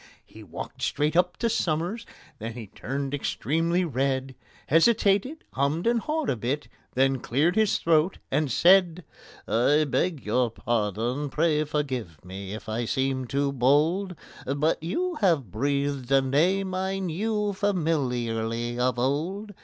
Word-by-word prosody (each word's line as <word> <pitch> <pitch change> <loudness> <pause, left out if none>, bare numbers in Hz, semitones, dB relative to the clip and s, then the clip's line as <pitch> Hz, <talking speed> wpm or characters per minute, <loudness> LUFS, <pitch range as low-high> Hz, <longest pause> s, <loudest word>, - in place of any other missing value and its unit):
He 110 - -14
walked 90 -5 -8
straight 150 +2 0
up 180 0 +2
to 235 - 0
SOMERS, 185 +1 -1 0.3
then 115 +1 -5
he 115 -1 -7
turned 135 +7 -5
extremely 165 +5 0
red, 135 -2 -1 0.3
Hesitated, 205 - +3
hummed 140 +5 0
and 235 0 +3
hawed 310 +4 -2
a - - 0
bit, 130 +6 -3 0.3
then 135 0 +2
cleared 150 +10 +1
his 220 -2 +3
throat, 165 +2 +2
and 145 0 +1
said: 180 +4 +4 0.4
"I 145 +7 +3
beg 160 +1 -1
your 120 +3 +1
pardon—pray 125 - 0
forgive 130 - -3
me 95 +2 -6
if 110 - -10
I 115 +2 -2
seem 130 +1 -1
too 140 +2 0
bold, 155 +9 +2 0.3
But 145 +4 0
you 345 - -2
have 160 - +2
breathed 140 +2 -1
a 135 -1 +5
name 180 +8 +1
I 190 +1 -1
knew 205 +3 -1
familiarly 120 - -1
of 125 -1 +1
old. 170 - -1
145 Hz, 140 wpm, -26 LUFS, 125-180 Hz, 0.4 s, a